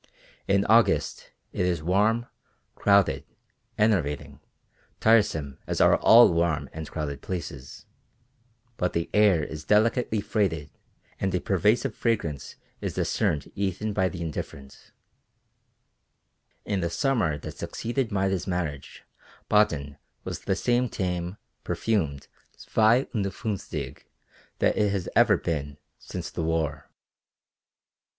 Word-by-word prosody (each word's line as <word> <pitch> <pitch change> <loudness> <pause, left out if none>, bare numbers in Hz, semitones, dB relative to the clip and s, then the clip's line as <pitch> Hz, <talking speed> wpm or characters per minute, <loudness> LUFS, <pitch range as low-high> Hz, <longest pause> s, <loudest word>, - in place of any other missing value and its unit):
In 100 0 +3
August 115 +2 +2 0.2
it - - -1
is 85 -3 0
warm, 105 +7 +2 0.5
crowded, 100 -9 +3 0.5
enervating, 90 -10 0 0.6
tiresome 100 -11 +2
as - - -2
are - - +6
all 115 -5 +7
warm 85 -2 0
and 80 -1 -6
crowded 70 -4 -4
places, 70 -8 -6 0.9
but 90 - -1
the 85 0 -2
air 105 -7 +4
is 75 0 -6
delicately 110 +3 +2
freighted 85 -9 -1 0.5
and 95 -1 0
a - - +1
pervasive 105 +8 +1
fragrance 90 - -2 0.3
is - - -3
discerned 75 -2 -1
even 100 +2 -2
by 95 -2 +1
the 90 -2 -7
indifferent. 70 -3 -7 1.8
In 100 - -1
the 85 -1 -1
summer 105 - +1
that - - -9
succeeded 120 0 -3
Maida's 95 -2 0
marriage 85 -7 -4 0.5
Baden 75 -9 +2 0.2
was - - -5
the 95 - -1
same 120 +4 +1
tame, 90 0 -3 0.3
perfumed 80 -11 -1 0.3
zwei 115 +4 +3
und 105 -4 0
funfzig 80 - -5 0.5
that - - +2
it 105 -1 +2
has 100 -3 -2
ever 115 -4 +5
been 75 -5 -3 0.2
since - - -7
the - - -4
war. 80 -3 -2
95 Hz, 115 wpm, -26 LUFS, 80-105 Hz, 1.8 s, all